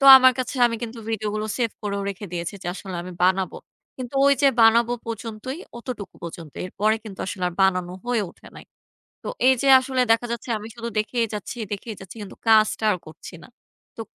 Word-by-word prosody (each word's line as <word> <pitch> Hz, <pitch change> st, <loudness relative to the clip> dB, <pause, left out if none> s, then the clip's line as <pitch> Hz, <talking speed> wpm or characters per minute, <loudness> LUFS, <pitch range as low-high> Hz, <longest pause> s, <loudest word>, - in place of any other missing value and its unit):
তো 275 Hz, -, +1 dB
আমার 260 Hz, 0 st, +7 dB
কাছে 255 Hz, +2 st, -2 dB
আমি 230 Hz, -, -2 dB
কিন্তু 235 Hz, 0 st, -5 dB
ভিডিওগুলো 215 Hz, 0 st, -2 dB
সেভ 235 Hz, -3 st, +1 dB
করেও 200 Hz, -1 st, -2 dB
রেখে 200 Hz, +1 st, -5 dB
দিয়েছি 170 Hz, +3 st, -3 dB
যে -, -, -7 dB
আসলে 190 Hz, -2 st, -7 dB
আমি 180 Hz, +1 st, -8 dB
বানাবো। 185 Hz, +1 st, +2 dB, 0.4 s
কিন্তু 255 Hz, 0 st, -7 dB
ওই 280 Hz, -, +6 dB
যে 275 Hz, -, +7 dB
বানাবো 230 Hz, +1 st, +6 dB
পর্যন্তই 230 Hz, +4 st, -5 dB, 0.2 s
অতটুকু 230 Hz, -5 st, -7 dB
পর্যন্তই 165 Hz, -3 st, -8 dB
এরপরে 215 Hz, +4 st, +1 dB
কিন্তু 200 Hz, -3 st, -9 dB
আসলে 190 Hz, -1 st, -5 dB
আর 175 Hz, -, -9 dB
বানানো 180 Hz, -2 st, +2 dB
হয়ে 240 Hz, -4 st, +1 dB
ওঠে -, -, -19 dB
নাই। -, -, -11 dB, 0.6 s
তো -, -, -5 dB, 0.2 s
এই 260 Hz, -, +7 dB
যে 275 Hz, -, +2 dB
আসলে 260 Hz, 0 st, -1 dB
দেখা 230 Hz, +1 st, +1 dB
যাচ্ছে 235 Hz, +1 st, -6 dB
আমি 215 Hz, +1 st, -8 dB
শুধু 235 Hz, 0 st, -5 dB
দেখেই 230 Hz, +2 st, 0 dB
যাচ্ছি, 210 Hz, +3 st, -6 dB
দেখেই 215 Hz, +2 st, -5 dB
যাচ্ছি 190 Hz, +4 st, -11 dB
কিন্তু 200 Hz, -, -9 dB
কাজটা 220 Hz, 0 st, +4 dB
আর 180 Hz, -, -2 dB
করছি 160 Hz, +3 st, -11 dB
না। -, -, -13 dB, 0.5 s
তো -, -, -8 dB
215 Hz, 200 wpm, -24 LUFS, 190-235 Hz, 0.6 s, আমার